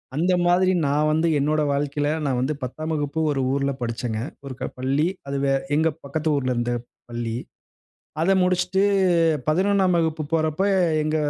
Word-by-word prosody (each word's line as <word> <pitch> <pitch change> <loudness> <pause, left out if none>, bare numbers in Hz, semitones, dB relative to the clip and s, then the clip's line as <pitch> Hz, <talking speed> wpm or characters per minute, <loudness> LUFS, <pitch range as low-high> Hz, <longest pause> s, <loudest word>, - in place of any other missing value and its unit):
அந்த 175 +5 +2
மாதிரி 185 +1 +4 0.2
நான் 150 +2 +2
வந்து 160 +2 +2
என்னோட 155 +2 +1
வாழ்க்கையில 145 +1 -1 0.2
நான் 130 -3 0
வந்து 135 +4 0
10ம் 155 +6 -4
வகுப்பு 145 0 -2
ஒரு 140 -2 -1
ஊர்ல 140 0 0
படிச்சங்க. 115 -1 -3 0.3
ஒரு 135 - -6
க - - -5 0.2
பள்ளி 135 +5 +1 0.2
அது 140 0 -2
வே 135 - +2 0.2
எங்க 160 +2 +3 0.2
பக்கத்து 155 +3 -2
ஊர்ல 130 -2 0
இருந்த 120 0 -1 0.4
பள்ளி. 120 -1 -3 0.9
அத 190 +4 +3
முடிச்சிட்டு 180 +1 +1 0.7
11ம் 190 +2 +3
வகுப்பு 160 -1 -1
போறப்ப, 155 +2 0 0.4
எங்க 155 +1 0
150 Hz, 155 wpm, -23 LUFS, 135-165 Hz, 0.9 s, மாதிரி